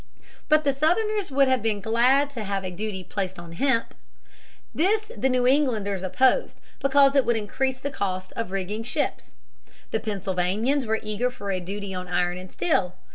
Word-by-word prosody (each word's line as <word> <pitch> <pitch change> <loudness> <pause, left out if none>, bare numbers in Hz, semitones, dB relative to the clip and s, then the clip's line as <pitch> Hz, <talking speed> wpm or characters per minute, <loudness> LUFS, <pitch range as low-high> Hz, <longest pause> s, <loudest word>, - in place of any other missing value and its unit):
But 305 0 +5
the 280 -2 +2
Southerners 390 +8 +1
would 275 0 +3
have 260 -1 +2
been 220 -2 0
glad 250 +7 +3
to 235 -6 -5
have 195 -1 -2
a 185 - -3
duty 190 0 -4
placed 190 0 -4
on 170 -1 -9
hemp. 230 +6 0 0.8
This 425 +6 +1
the 265 - +1
New 250 -1 +2
Englanders 230 -8 +2
opposed 255 - +2 0.2
because 275 0 +4
it 275 - +5
would 235 -2 +1
increase 260 +5 -2
the 280 +2 -4
cost 185 -7 -3
of 230 -4 -3
rigging 195 +3 -3
ships. 240 +2 -3 0.6
The 220 - 0
Pennsylvanians 205 +6 -1
were 220 0 +1
eager 215 +3 -1
for 205 -5 -5
a 185 - -1
duty 195 +2 -5
on 180 0 -5
iron 180 0 0
and 185 0 -10
steel. 180 +1 0
220 Hz, 180 wpm, -25 LUFS, 190-270 Hz, 0.8 s, But